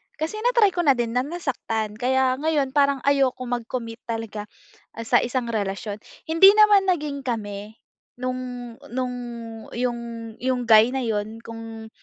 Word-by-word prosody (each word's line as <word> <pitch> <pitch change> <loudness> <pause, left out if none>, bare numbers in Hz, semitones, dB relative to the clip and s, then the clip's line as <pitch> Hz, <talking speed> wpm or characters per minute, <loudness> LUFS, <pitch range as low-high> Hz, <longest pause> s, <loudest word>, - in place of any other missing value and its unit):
kasi 320 +8 -3
natry 470 -4 +4
ko 355 - -5
na 275 -2 +6
din 240 -1 -1
na 250 +2 0
nasaktan 235 -9 -3
kaya 260 0 +2
ngayon 300 -3 +1
parang 280 -2 +2
ayokong 265 -3 +1
mag-commit 230 -1 -6
talaga, 225 -2 -4 0.5
ah, 230 - -5
sa 240 +2 +4
isang 245 0 -2
relasyon. 205 0 -3 0.3
Hindi 330 +5 +8
naman 415 -2 +6
naging 300 -6 0
kami, 210 -3 -4 0.4
nung, 250 -1 -5 0.2
nung 250 -1 -2 0.6
yung, 240 0 -1 0.4
yung 250 -2 -1
guy 225 +3 +7
na 265 - -1
'yon 220 -1 -3
kung, 225 -1 -9
250 Hz, 145 wpm, -24 LUFS, 225-280 Hz, 0.6 s, Hindi